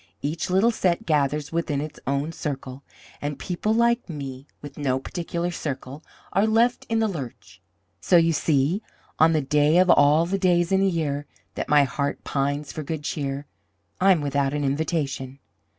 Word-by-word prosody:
Each 155 +5 -2
little 195 +6 +4
set 180 -6 0
gathers 150 -1 0
within 165 -4 -1
its 150 +1 -6
own 140 +3 0
circle; 135 -4 -5 0.4
and 145 -1 -3
people 180 +7 -2
like 235 0 +2
me, 135 -3 -7
with 145 -1 -10
no 135 -3 0
particular 170 +4 -3
circle, 145 -2 -5 0.3
are 195 +4 +3
left 230 +3 +2
in 225 - +1
the 225 0 +2
lurch. 140 - -7 0.4
So 175 - +4
you 165 0 +4
see, 150 +5 +1 0.4
on 160 +1 +6
the 155 - +2
day 150 +3 +3
of 180 -1 +5
all 150 +3 +5
the 195 +3 -1
days 175 -1 +2
in 190 - +4
the 195 0 +3
year 145 -4 -2 0.3
that - - -4
my 145 -1 +6
heart 140 +1 -2
pines 140 +1 -2
for 155 - -5
good 155 0 -4
cheer, 140 -1 -3 0.5
I'm 185 -4 +4
without 140 0 0
an 145 - -1
invitation. 140 -2 -2
150 Hz, 170 wpm, -24 LUFS, 140-175 Hz, 0.5 s, on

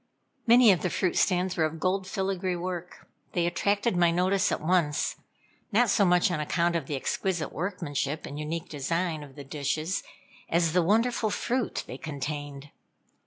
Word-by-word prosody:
Many 235 -1 +8
of 180 - +2
the 180 - 0
fruit 180 +1 0
stands 180 -1 +2
were 165 - +1
of 155 +1 -2
gold 185 +2 0
filigree 190 -1 -1
work. 180 0 -5 0.3
They 175 -1 +1
attracted 200 +5 +1
my 175 -1 +4
notice 185 +3 +2
at - - 0
once, 160 -2 +1 0.5
not 225 +1 +4
so 200 - +4
much 180 0 +4
on 165 - -1
account 170 +3 +1
of 160 -5 -2
the 145 - -2
exquisite 175 +5 -2
workmanship 160 -5 -3
and 145 - -7
unique 160 +2 -4
design 160 +3 -2
of 140 -2 -12
the 145 - -8
dishes, 155 +5 -2 0.5
as 170 -1 +2
the 180 - +4
wonderful 220 +5 +2
fruit 240 +4 -1
they - - -8
contained. 145 -1 -5
175 Hz, 165 wpm, -28 LUFS, 155-190 Hz, 0.5 s, Many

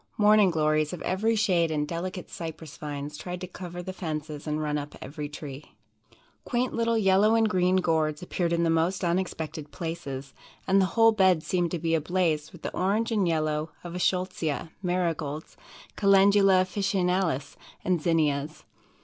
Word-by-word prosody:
Morning 210 -1 +6
Glories 155 -1 +1
of 180 - -6
every 220 +5 +1
shade 180 -6 +2
and 150 -1 -1
delicate 180 +2 -4
Cypress 160 -3 -7
vines 145 0 -6
tried 180 0 -5
to - - -3
cover 175 -1 -8
the 185 - -5
fences 155 -4 -5
and 150 0 -1
run 150 -1 -1
up 145 0 -4
every 145 +2 -6
tree. 145 -1 -9 0.7
Quaint 250 0 -1
little 230 0 +1
yellow 205 +1 +4
and 225 -1 +4
green 185 -2 +2
Gourds 160 -3 +1
appeared 175 -1 -1
in 170 0 +2
the 165 - +2
most 170 +4 +1
unexpected 165 -4 -2
places, 145 -5 -5 0.3
and 195 +1 +4
the 190 - +3
whole 225 0 +7
bed 185 -6 +3
seemed 175 -2 0
to 175 - -2
be 165 0 -1
ablaze 160 -1 0
with 175 - -14
the - - -4
orange 210 +5 +1
and 205 -5 +2
yellow 155 -1 0
of 175 -1 -7
the 180 - -4
Eschscholtzia, 180 -4 -1
Marigolds, 165 -5 -2 0.4
Calendula 195 -1 +5
Officinalis 185 -5 0 0.3
and 180 -3 +1
Zinnias. 155 -3 0
175 Hz, 165 wpm, -27 LUFS, 155-190 Hz, 0.7 s, whole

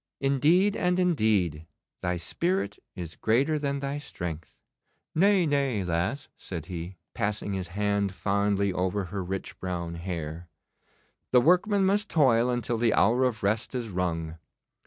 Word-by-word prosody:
'Indeed, 155 +9 +3
and 180 0 +1
indeed, 105 - +1 0.3
thy 90 -1 -1
spirit 175 - -1 0.2
is 85 -4 -6
greater 140 +8 +2
than 140 -1 -1
thy 140 +1 -3
strength.' 85 - -6 0.6
'Nay, 190 +1 +4
nay, 140 -8 +1
lass,' 90 +11 -1
said 85 -5 -7
he, 90 +1 -6 0.2
passing 105 -2 -2
his 95 -2 -3
hand 100 +1 0
fondly 100 0 0
over 95 +2 0
her 95 +2 -4
rich 95 +2 -5
brown 85 -2 -3
hair. 85 -1 -5 0.8
The 125 - +7
workman 190 - +4
must 205 +2 +1
toil 125 -6 +4
until 120 -1 -1
the 115 -2 +3
hour 120 +5 +4
of 115 -4 -2
rest 110 +6 0
is 120 -3 -3
rung. 85 -3 -2
105 Hz, 140 wpm, -27 LUFS, 90-140 Hz, 0.8 s, The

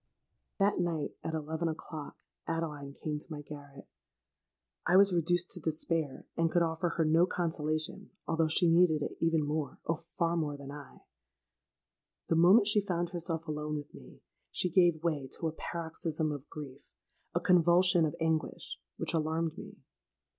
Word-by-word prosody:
"That 200 -1 +2
night, 165 -4 -1
at 160 - -2
eleven 160 +2 -2
o'clock, 155 -1 -6 0.3
Adeline 150 -4 -3
came 150 +1 -4
to 160 - -12
my 150 -1 -5
garret. 145 -2 -11 1.0
I 180 - +6
was 200 -1 +6
reduced 175 +1 +1
to 180 - -3
despair; 160 -2 -2
and 165 0 +2
could 175 +1 +3
offer 165 +1 0
her 165 - +3
no 165 +3 +4
consolation, 155 -3 -2 0.2
although 165 0 +2
she 170 +3 +3
needed 165 -3 +4
it - - -4
even 165 -2 +2
more—oh! 150 +1 -2 0.2
far 170 0 +2
more 150 -3 -1
than 140 0 -9
I. 145 -1 -11 1.3
The - - +3
moment 185 +7 +7
she 210 0 +4
found 175 -3 -1
herself 165 -2 -2
alone 150 0 -3
with 145 0 -8
me, - - -14 0.3
she 180 - -1
gave 175 -3 +4
way 150 -5 0
to 165 - -1
a - - -1
paroxysm 160 -1 -3
of 145 -1 -7
grief—a 140 -4 -8
convulsion 175 0 +5
of 155 0 0
anguish, 160 -1 -2 0.2
which - - -2
alarmed 160 0 0
me. - - -10
160 Hz, 155 wpm, -31 LUFS, 150-170 Hz, 1.3 s, moment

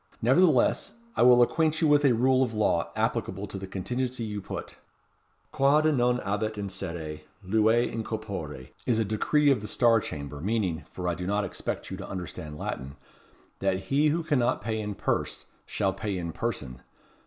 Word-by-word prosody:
Nevertheless, 135 +2 +3 0.2
I - - +1
will 125 0 +8
acquaint 155 +4 +1
you 160 - +3
with 145 0 +5
a 130 - +5
rule 130 +3 +3
of 120 -4 0
law 95 -5 +1
applicable 95 +2 -1
to 95 -1 -7
the 95 - -6
contingency 125 +6 -3
you 105 -2 -4
put. - - -6 0.8
'Quod 140 +3 +3
non 125 -1 +3
habet 105 +2 -2
in 100 -1 -3
cere, 85 -5 -5 0.3
luet 110 +4 +3
in 115 0 -3
corpore' 95 - -5 0.2
is 120 -3 +3
a 110 - +1
decree 145 +8 +2
of 125 -6 +2
the 105 - -6
Star 115 +1 +4
Chamber; 70 -6 -6
meaning, 95 -4 -1
for 90 -1 -5
I 90 - +1
do 90 +2 -5
not 100 +1 +1
expect - - -5
you - - -4
to - - -8
understand 80 -4 -6
Latin, 70 -2 -5 0.6
that 95 -1 +1
he 145 +3 +4
who 165 +3 +1
cannot 145 -7 +1
pay 110 0 -1
in 105 -1 -4
purse - - -2 0.2
shall 95 -2 0
pay 100 0 -3
in 85 -2 -3
person. 75 - -4
110 Hz, 180 wpm, -28 LUFS, 95-125 Hz, 0.8 s, will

